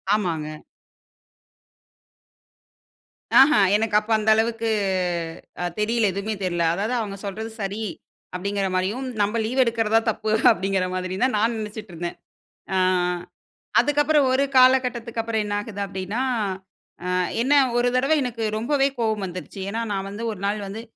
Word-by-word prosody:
ஆமாங்க. 160 -6 -3 2.8
ஆஹா! 275 +3 +7 0.2
எனக்கு 215 0 0
அப்ப 215 +2 -8
அந்த 215 0 0
அளவுக்கு 225 0 0 0.9
அ - - -1 0.2
தெரியல 225 +1 +1
எதுவுமே 200 +3 -3
தெரியல. 175 -2 0
அதாவது 210 +7 -2
அவுங்க 200 -3 -4
சொல்றது 220 +3 -5
சரி. 200 +3 -3 0.5
அப்பிடிங்கிறமாரியும் 195 +5 -1 0.2
நம்ம 210 +3 +1
லீவு 250 +4 -2
எடுக்கிறதா 230 -3 -1
தான் 225 - 0
தப்பு 215 0 -2 0.2
அப்பிடிங்கிற 195 -3 +1
மாரியும் 185 +3 -2
தான் 260 - 0
நான் 225 +2 +1
நினச்சிட்டு 215 -1 -7
இருந்தேன். 170 +1 -5 0.6
ஆ - - +2 1.0
அதுக்கப்புறம் 295 0 +3
ஒரு 270 +2 +3
காலகட்டத்துக்கப்புறம் 235 -4 +3
என்ன 205 - -3
ஆகுது 205 -2 -6
அப்பிடின்னா, 195 +4 -4 0.8
அ - - -2 0.3
என்ன 265 +4 +2 0.2
ஒரு 245 0 +3
தடவ 270 +5 +3
எனக்கு 235 -3 -4
ரொம்பவே 275 +4 +2
கோவம் 220 -3 0
வந்துருச்சு. 185 +2 -7
ஏன்னா, 225 +3 -2
நான் 195 -1 -2
வந்து 205 +3 -6
ஒரு 210 - -8
நாள் 205 +1 0
வந்து 210 +4 -6
215 Hz, 135 wpm, -23 LUFS, 195-235 Hz, 2.8 s, ஆஹா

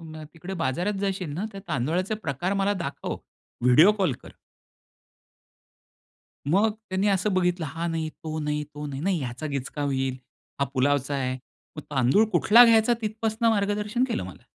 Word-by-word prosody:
न 155 -1 -9
तिकडे 175 +4 -7
बाजारात 175 +11 -1
जाशील 190 -5 -2
ना, 185 +7 -3
त्या 195 - -8
तांदुळाचे 170 - -1
प्रकार 175 - -3
मला 205 - +2
दाखव. 140 - -4 0.5
व्हिडिओ 150 +11 +7
कॉल 190 -9 0
कर." - - -12 2.2
मग 200 +7 +3
त्यांनी 210 -2 -2
असं 195 +1 +1
बघितलं, 180 -2 +1
हा 165 +4 -4
नाही 165 -1 -2
तो 155 0 -6
नाही, 150 0 -1
तो 150 0 -5
नाही. 135 -1 -5
नाही 190 0 +1
ह्याचा 125 +3 -5
गिचका 140 0 -4
होईल. 135 -2 -1 0.4
हा - - +4
पुलावचा 140 +1 +1
आहे. 130 -2 -1 0.4
मग 150 - -6
तांदूळ 135 - +4
कुठला 235 +3 +7
घ्यायचा 230 0 +5
तिथपासून 220 +1 0
मार्गदर्शन 210 +2 +1
केलं 235 - -2
मला. 90 - -11
170 Hz, 155 wpm, -26 LUFS, 145-205 Hz, 2.2 s, व्हिडिओ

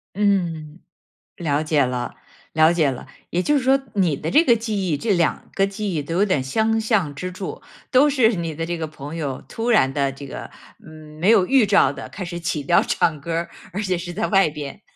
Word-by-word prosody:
嗯， 175 -6 0 0.6
了 150 -3 0
解 155 -2 +2
了 125 -1 -3 0.4
了 155 +1 +5
解 160 -5 +2
了。 130 - -6 0.2
也 175 - 0
就 295 +6 +3
是 270 - -1
说 270 +1 +3
你 180 -7 +2
的 155 +4 -4
这 315 - +6
个 240 -8 +5
记 215 -4 -2
忆， 150 - +1
这 220 +8 -1
两 170 -3 0
个 195 0 +2
记 200 0 -4
忆 155 - -1
都 165 +4 -5
有 195 +3 +3
点 185 -10 0
相 220 +11 +1
像 215 -9 +1
之 180 +6 -5
处。 185 +1 -7 0.3
都 275 +3 +5
是 250 -5 +3
你 165 -3 -4
的 165 +2 -3
这 170 +1 -3
个 160 -1 -3
朋 150 0 -9
友， 145 -5 -4
突 230 +2 -3
然 135 - +4
地 140 -1 0
这 135 +1 -10
个 - - -7 0.7
没 180 +5 +2
有 210 -5 +5
预 265 +1 +4
兆 205 0 +4
地 - - -8
开 200 - -7
始 175 0 -5
起 165 -3 -2
调 170 +5 +4
唱 155 -3 0
歌 165 +3 -4
儿， 170 +1 -2 0.2
而 200 - -2
且 185 -3 0
是 175 0 -6
在 215 +5 -1
外 195 -5 +4
边。 150 +3 -8
175 Hz, 240 characters per minute, -22 LUFS, 150-210 Hz, 0.7 s, 这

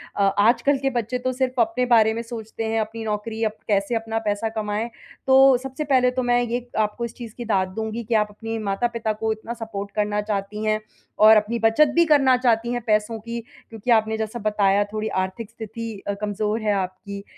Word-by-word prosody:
अ, - - -1 0.2
आजकल 245 +6 +4
के 270 0 0
बच्चे 240 -1 -2
तो 255 +1 -1
सिर्फ 255 0 -1
अपने 230 +2 +2
बारे 225 -3 +4
में 230 - -3
सोचते 225 -1 -6
हैं। 225 0 0
अपनी 225 +1 -5
नौकरी 220 +1 -3
अप 215 0 -1
कैसे 200 +2 +1
अपना 225 0 -2
पैसा 210 +2 0
कमाएँ। 215 +1 -3 0.4
तो 265 0 +7
सबसे 270 +3 -4
पहले 260 -3 +3
तो 255 0 -2
मैं 245 0 +3
ये 240 +1 -3
आपको 215 +2 0
इस 235 - -7
चीज़ 230 -3 -9
की 240 - -5
दाद 190 -4 +1
दूँगी 220 +1 -3
कि 230 +2 -3
आप 210 -1 +3
अपने 225 +2 -5
माता-पिता 220 +2 -1
को 220 +1 -2
इतना 220 +2 -7
सपोर्ट 210 -4 -6
करना 210 0 0
चाहती 210 0 -3
हैं 215 0 +1 0.5
और 220 0 +9
अपनी 220 +3 0
बचत 225 +7 +4
भी 340 0 +5
करना 280 -5 +5
चाहती 235 -2 +1
हैं 240 - -2
पैसों 215 +1 +1
की, 235 +2 -5 0.3
क्योंकि 225 +2 -3
आपने 220 -1 +3
जैसा 220 +2 -4
बताया 205 -2 +2
थोड़ी 215 0 -2 0.2
आर्थिक 200 +4 -6
स्थिति 230 0 -7 0.2
अ, 200 - 0
कमजोर 210 +1 -1
है 210 -1 +1
आपकी। 200 +1 -4
225 Hz, 205 wpm, -23 LUFS, 210-240 Hz, 0.5 s, और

